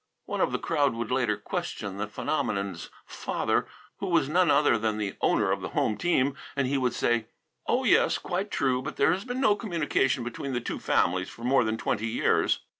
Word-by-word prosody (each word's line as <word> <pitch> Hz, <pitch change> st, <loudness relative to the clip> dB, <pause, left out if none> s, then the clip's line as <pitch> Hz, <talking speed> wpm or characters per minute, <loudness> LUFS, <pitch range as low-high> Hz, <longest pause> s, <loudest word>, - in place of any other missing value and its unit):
One -, -, -3 dB
of -, -, +2 dB
the -, -, 0 dB
crowd 145 Hz, -6 st, +1 dB
would 115 Hz, 0 st, -4 dB
later 120 Hz, -5 st, +1 dB
question 100 Hz, -1 st, -4 dB
the 100 Hz, +1 st, -2 dB
phenomenon's 100 Hz, -1 st, -2 dB, 0.2 s
father, -, -, -1 dB, 0.3 s
who 195 Hz, -, -3 dB
was 170 Hz, -6 st, +2 dB
none 175 Hz, +2 st, +3 dB
other 145 Hz, -3 st, +4 dB
than 110 Hz, -1 st, -1 dB
the 105 Hz, -2 st, -3 dB
owner -, -, +2 dB
of -, -, -1 dB
the -, -, -4 dB
home 110 Hz, -, +2 dB
team, 140 Hz, -4 st, +1 dB, 0.2 s
and 140 Hz, -1 st, +1 dB
he 140 Hz, -, 0 dB
would 125 Hz, -3 st, 0 dB
say, 115 Hz, -2 st, +1 dB, 0.4 s
"Oh, -, -, +2 dB
yes, -, -, +4 dB
quite 190 Hz, +4 st, -3 dB
true, 130 Hz, -7 st, +1 dB
but 150 Hz, +3 st, -6 dB
there 160 Hz, -, +3 dB
has 190 Hz, +3 st, -4 dB
been 250 Hz, 0 st, -3 dB
no 240 Hz, -6 st, +4 dB
communication 160 Hz, -, 0 dB
between 125 Hz, +3 st, -5 dB
the 120 Hz, -, 0 dB
two -, -, -4 dB
families 95 Hz, +1 st, +1 dB
for 115 Hz, -, -12 dB
more 125 Hz, +1 st, +3 dB
than 110 Hz, 0 st, -1 dB
twenty 110 Hz, 0 st, -1 dB
years." 115 Hz, -, +1 dB
130 Hz, 205 wpm, -27 LUFS, 110-155 Hz, 0.4 s, other